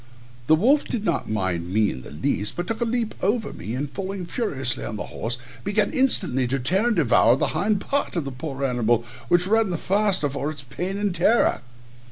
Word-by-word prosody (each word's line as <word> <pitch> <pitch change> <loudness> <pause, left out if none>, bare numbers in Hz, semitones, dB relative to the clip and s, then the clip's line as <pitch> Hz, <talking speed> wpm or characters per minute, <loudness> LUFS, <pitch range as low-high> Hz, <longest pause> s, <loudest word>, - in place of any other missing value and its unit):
The 155 - +6
wolf 265 - +3
did 220 -3 -3
not - - -1
mind 90 -5 -2
me 105 +1 +2
in 65 - -7
the - - -11
least, 80 +8 -2
but 175 - -3
took 225 +5 -4
a - - +3
leap 230 -1 -1
over 215 +3 0
me, 110 - -5
and 140 +3 -2
falling 190 +4 -5
furiously 135 - -2
on - - -4
the 105 - -4
horse, 120 +2 -3 0.3
began 205 +1 +1
instantly 180 - +3
to 135 +3 0
tear 185 - +1
and 240 - +2
devour 120 - +5
the - - 0
hind 205 -1 +1
part 280 -2 -1
of 165 -5 -1
the 135 - -4
poor 135 +1 -4
animal, 120 -2 +1 0.2
which 175 0 +3
ran 220 +1 +2
the 175 - -1
faster 195 -3 +1
for 140 +2 -3
his 140 -3 -7
pain 180 +9 -4
and 205 -2 0
terror. 185 +7 +3
170 Hz, 215 wpm, -24 LUFS, 125-205 Hz, 0.3 s, The